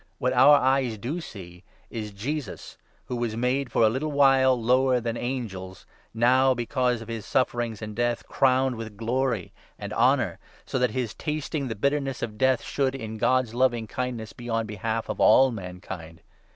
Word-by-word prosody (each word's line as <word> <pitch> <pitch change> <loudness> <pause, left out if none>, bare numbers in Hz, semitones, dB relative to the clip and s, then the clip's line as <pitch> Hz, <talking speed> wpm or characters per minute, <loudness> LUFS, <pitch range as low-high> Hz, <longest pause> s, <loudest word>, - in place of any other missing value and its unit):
What 125 +1 0
our 135 +4 +7
eyes 130 -3 +2
9 110 - -10
do 145 - -3
see 90 - -11 0.3
is 110 -2 -4
Jesus, 120 +4 -5 0.3
who 125 - -4
was 120 -2 -2
made 125 +1 0
for 115 - +3
a 130 +8 +2
while 135 -3 +4
lower 125 +2 +3
than 115 -1 -3
angels, 105 -8 -5 0.3
now, 130 +3 +3
because 125 0 0
of - - -14
his 115 -2 -5
sufferings 120 -3 -1
and 105 0 -6
death, 120 0 -1
crowned 130 -1 +2
with 110 -2 -8
glory 115 -2 -1 0.2
and 105 0 -6
honour; 120 -6 +2 0.3
so 130 - -2
that 125 0 +2
his 125 -4 -3
tasting 150 -2 -3
the 110 - -4
bitterness 140 +2 -1
of 105 -2 -5
death 130 -1 +3
should, 135 -1 -1
in 110 -4 -6
God's 130 -1 +2
loving 120 -2 +1
kindness, 120 -1 -4
be 120 0 -9
on 115 0 0
behalf 110 +2 -3
of - - -4
all 135 0 +6
mankind. 90 -5 -8
120 Hz, 175 wpm, -26 LUFS, 110-130 Hz, 0.3 s, our